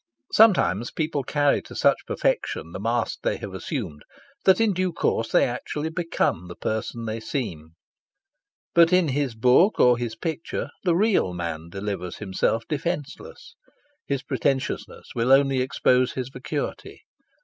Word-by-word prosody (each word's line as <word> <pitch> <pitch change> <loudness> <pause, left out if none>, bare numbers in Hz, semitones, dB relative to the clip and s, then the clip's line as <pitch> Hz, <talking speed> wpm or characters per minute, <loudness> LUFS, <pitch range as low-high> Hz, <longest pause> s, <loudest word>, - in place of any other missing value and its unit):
Sometimes 120 - +4
people 155 -2 -2
carry 145 +2 +1
to - - -12
such - - +2
perfection 80 - -1
the 95 - -6
mask 115 +3 -1
they - - 0
have - - -7
assumed 75 0 -5 0.4
that 190 +1 +6
in 225 -3 +3
due 185 0 0
course 115 -8 -1
they - - +5
actually 150 +5 -3
become 160 - -1
the 90 - -9
person 110 +1 -3
they 110 +1 -3
seem. 90 - -5 1.0
But 170 0 +6
in 180 -4 +4
his 135 -3 -1
book 125 - +4
or 125 -1 +5
his 120 -2 -3
picture 165 +6 -4
the 175 -3 +2
real 190 - +2
man 85 -2 -5
delivers 95 -2 -5
himself 105 +3 -1
defenceless. 160 - -5 0.5
His 140 -2 -2
pretentiousness 135 -2 -2
will 120 +2 +1
only 135 -1 +4
expose 130 0 +2
his 130 -1 -4
vacuity. 125 -1 -5
130 Hz, 145 wpm, -24 LUFS, 110-160 Hz, 1.0 s, that